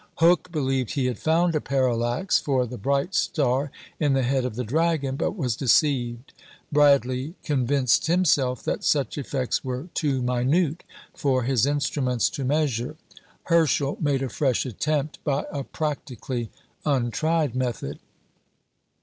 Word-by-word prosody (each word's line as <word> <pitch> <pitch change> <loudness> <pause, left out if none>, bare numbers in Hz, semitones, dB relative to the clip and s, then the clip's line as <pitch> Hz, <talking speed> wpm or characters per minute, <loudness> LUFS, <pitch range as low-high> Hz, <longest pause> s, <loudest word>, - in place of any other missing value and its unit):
Hooke 175 +2 +3
believed 135 -6 -1
he 140 -4 0
had 125 -3 -2
found 165 +2 +2
a 155 - 0
parallax 125 +4 +1
for 130 -3 0
the 125 +1 -8
bright 140 - 0
star 140 -7 +1 0.3
in 145 -3 +2
the 135 -1 +2
Head 130 +1 +1
of 125 -4 -4
the 125 - -2
Dragon; 145 +1 0
but 200 - -2
was 125 -9 -1
deceived. 125 -2 +1 0.4
Bradley 140 0 +3
convinced 135 -1 +2
himself 145 -8 +2
that - - -2
such 140 -2 +1
effects 130 -2 -2
were 130 +6 -4
too 140 -5 0
minute 140 +7 +1 0.3
for 130 -4 0
his 130 0 +2
instruments 135 -4 0
to 140 - -4
measure. 135 -2 0 0.5
Herschel 155 -4 +2
made 140 -3 +1
a 135 - -2
fresh 130 +2 0
attempt 150 +5 -2
by 140 -1 0
a 140 -1 -3
practically 130 -6 -4 0.3
untried 145 +2 0
method. 120 - -3
135 Hz, 140 wpm, -25 LUFS, 125-150 Hz, 0.5 s, Hooke